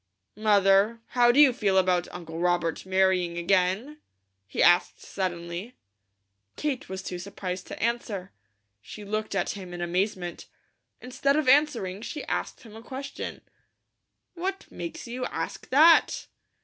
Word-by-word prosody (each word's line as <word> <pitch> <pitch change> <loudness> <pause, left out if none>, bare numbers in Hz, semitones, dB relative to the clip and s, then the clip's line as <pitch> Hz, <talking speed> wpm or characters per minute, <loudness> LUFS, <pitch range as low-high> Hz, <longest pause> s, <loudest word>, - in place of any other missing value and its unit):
"Mother, 205 +1 +4
how 240 -1 +4
do 265 - +2
you 285 -4 +7
feel 200 -5 +1
about 180 -2 +2
Uncle 165 -2 -7
Robert 175 0 0
marrying 185 -2 +2
again?" 190 - +1 0.5
he 100 - 0
asked 175 +1 +4
suddenly. 180 +4 -5 0.8
Kate 285 -8 -3
was 190 0 -5
too 180 -1 -5
surprised 185 -1 -6
to - - -8
answer. 215 -5 -2 0.5
She 205 - -10
looked 215 0 -3
at 195 - 0
him 185 -3 -8
in - - -7
amazement. 180 0 -2 0.5
Instead 275 +3 0
of 305 -3 0
answering, 245 -9 +3
she 290 +6 -6
asked - - -3
him 220 -2 -13
a 225 - -10
question: 270 +3 -7 0.9
"What 380 +2 -4
makes 330 -1 -7
you 250 +2 -4
ask - - -5
that?" 320 +5 +5
200 Hz, 135 wpm, -27 LUFS, 180-250 Hz, 0.9 s, you